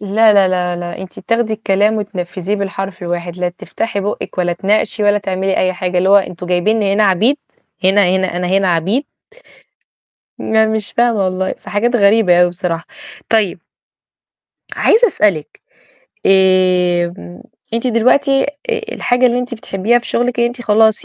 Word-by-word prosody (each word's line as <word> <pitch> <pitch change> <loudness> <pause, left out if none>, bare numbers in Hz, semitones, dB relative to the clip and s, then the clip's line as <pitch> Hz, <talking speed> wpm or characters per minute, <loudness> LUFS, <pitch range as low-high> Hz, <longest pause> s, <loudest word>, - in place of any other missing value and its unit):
لا 210 +2 +3
لا 195 -2 +4
لا 180 -1 -1
لا 175 0 -6
أنتِ 190 - -11
بتاخدي 230 -1 -1
الكلام 210 0 +1
وتنفذيه 190 -1 -4
بالحرف 195 -1 -5
الواحد، 175 0 -4
لا 180 -1 -1
تفتحي 200 +4 -5
بُوقك 200 -1 -5
ولا 175 -1 +1
تناقشي 205 +4 0
ولا 205 0 +3
تعملي 190 -1 -2
أي 185 0 +1
حاجة، 180 0 -2
اللي 185 +2 +1
هو 200 - +6
أنتم 180 -2 -2
جايبيني 195 +3 +1
هنا 215 - +2
عبيد 205 +8 +3 0.5
هنا 195 +2 +4
هنا 185 -2 -2
أنا 180 0 -2
هنا 190 +1 +1
عبيد! 185 - 0 1.3
لا 220 0 +1
مش 220 -2 -2
فاهمة 235 -4 +1
والله، 185 0 -2
في - - -11
حاجات 240 +4 +1
غريبة 200 -4 +4
أوي 180 - +4
بصراحة. 175 -2 -4 0.4
طيب 210 -6 0 1.2
عايزة 470 +2 +4
أسألِك 200 - -1 0.7
آمم 180 - +2 0.3
أنتِ 230 +2 -1
دلوقتي 255 +4 +2
آآ 460 - -4
الحاجة 250 - +1
اللي 245 0 +1
أنتِ 250 -1 -4
بتحبيها 220 +1 0
في 240 - -10
شغلِك، 245 0 -1
إن 235 - +3
أنتِ 240 +1 -6
خلاص 220 -1 +2
200 Hz, 155 wpm, -16 LUFS, 180-225 Hz, 1.3 s, هو